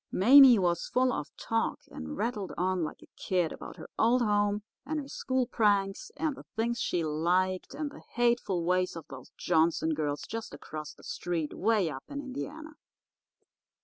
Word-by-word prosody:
Mame 255 +3 +8
was 170 -1 +1
full 255 0 +2
of 150 - -3
talk 225 0 -1
and 80 -1 -6
rattled 210 -6 -2
on 185 0 +1
like 155 - -6
a - - -16
kid 180 -4 0
about - - -9
her - - -9
old 240 +2 +4
home 205 -1 +1 0.2
and 305 +3 -2
her 280 - -6
school 260 -2 -1
pranks 205 -5 +1
and 300 0 -1
the - - -11
things 235 +2 0
she 175 - 0
liked 180 +4 0
and 295 0 -3
the - - -12
hateful 235 -7 +1
ways 180 +1 +1
of 165 - -7
those 130 -1 -10
Johnson 160 -1 +2
girls 150 -1 -2
just 225 -9 -6
across 155 +1 -8
the - - -19
street, 165 -4 -3
'way 210 -3 +2
up 135 -1 -7
in 285 - -5
Indiana. 290 +3 -6
200 Hz, 175 wpm, -30 LUFS, 170-245 Hz, 0.2 s, Mame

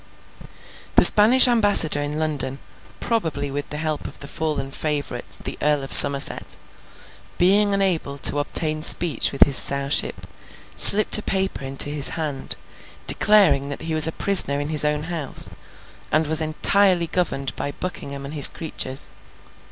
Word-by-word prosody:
The - - +3
Spanish 235 +6 +6
ambassador 205 -11 +2
in 145 +1 -7
London—probably 150 - -7
with 145 +1 -8
the 150 - -6
help 155 -1 -7
of - - -14
the 140 - -12
fallen 150 -3 -7
favourite, 145 -5 -7
the - - -8
Earl 150 -1 -2
of 135 - -4
Somerset—being 190 +7 +2
unable 175 -8 -4
to 145 +1 0
obtain 155 +1 -3
speech 165 +1 +2
with 140 - +2
his 140 -3 +1
Sowship, 140 +1 +1 0.5
slipped 215 +1 +5
a - - -9
paper 190 -7 -4
into 135 +2 +1
his 145 -1 -1
hand, 150 -4 -7 0.5
declaring 165 -10 0
that 140 - -10
he 165 - -6
was 155 0 +7
a - - -5
prisoner 160 -7 +3
in 145 +1 -7
his 155 -2 0
own 150 0 -3
house, 160 -4 -4 0.6
and 155 +1 -1
was 160 +1 0
entirely 175 +3 0
governed 155 -6 -5
by 145 - -7
Buckingham 140 -6 -10
and 140 - -11
his 145 -3 +6
creatures. 135 -4 -6
155 Hz, 145 wpm, -18 LUFS, 140-175 Hz, 0.6 s, was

